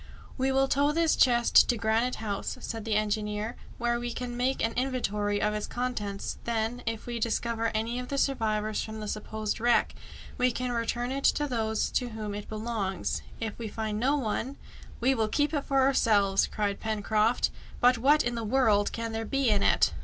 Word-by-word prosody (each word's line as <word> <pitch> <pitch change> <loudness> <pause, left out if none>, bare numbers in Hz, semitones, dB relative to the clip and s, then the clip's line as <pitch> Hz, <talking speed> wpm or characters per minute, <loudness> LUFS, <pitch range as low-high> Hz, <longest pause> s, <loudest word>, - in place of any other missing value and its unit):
"We 265 0 +1
will 270 0 +3
tow 285 +2 +2
this 330 +1 +2
chest 240 -2 +5
to 240 - +2
Granite 225 +3 +1
House," 205 -3 -4
said 225 -2 -5
the 220 -2 0
engineer, 210 +1 -1 0.2
"where 235 0 0
we 240 0 -3
can 245 0 -5
make 255 +2 0
an 225 - -2
inventory 210 -6 -1
of 210 +1 +1
its 210 0 -3
contents, 220 -5 -3
then, 230 +1 -1
if 225 -1 -3
we 240 -1 -4
discover 230 0 0
any 230 +3 -1
of 250 - -5
the 280 - -3
survivors 215 -6 0
from 220 0 -6
the 215 - -5
supposed 215 0 -3
wreck, 240 +1 +3 0.5
we 250 0 +3
can 250 +1 -3
return 240 +1 -1
it 275 +1 -2
to 295 - +3
those 220 -4 -1
to 250 -2 0
whom 215 -2 -5
it 205 0 -7
belongs. 215 -4 -2 0.2
If 225 -1 -4
we 230 - -4
find 215 0 -3
no 270 +5 +2
one 265 +1 -2 0.2
" - - -17
"We 260 +3 +4
will 225 -4 +1
keep 290 +7 0
it 290 -2 -1
for 270 -1 +2
ourselves!" 210 -7 +3
cried 205 -2 -2
Pencroft 215 +1 +1 0.3
"But 245 -1 +4
what 290 +5 +4
in 240 - -1
the 230 -1 -3
world 215 -3 +3
can 230 0 -4
there 225 0 -3
be 275 +2 +1
in 205 -1 +3
it?" - - +3
230 Hz, 200 wpm, -28 LUFS, 215-250 Hz, 0.5 s, chest